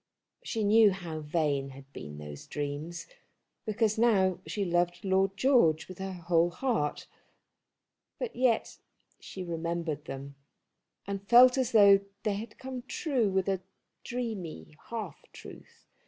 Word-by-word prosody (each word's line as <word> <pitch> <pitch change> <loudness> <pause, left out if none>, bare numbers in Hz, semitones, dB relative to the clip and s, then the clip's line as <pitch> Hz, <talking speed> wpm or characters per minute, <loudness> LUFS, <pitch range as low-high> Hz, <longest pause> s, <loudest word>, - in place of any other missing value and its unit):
She 225 - -2
knew 215 +1 +6
how 175 -5 -5
vain 150 -3 -1
had 135 0 -14
been 75 0 -8
those 75 -1 -9
dreams, 145 +4 -4 0.6
because 215 0 +1
she - - 0
now 190 -6 +3 0.2
loved 175 -2 0
Lord 190 +1 +2
George 215 - +3
with 185 0 -11
her 190 0 -4
whole 170 -1 +2
heart; 220 - -1 1.1
but - - -5
yet 245 -3 +1 0.4
she 190 - -8
remembered 165 -3 -3
them, 135 +1 -7 0.7
and 200 0 -4
felt 250 +1 +8
as 260 -3 0
though 200 -3 +7 0.2
they 210 - +1
had 220 +1 -8
come 260 -1 -6
true 255 - 0
with 190 0 0
a 190 -2 0 0.4
dreamy 220 -11 -5
half 230 -2 -5
truth. - - -13
190 Hz, 135 wpm, -30 LUFS, 160-225 Hz, 1.1 s, felt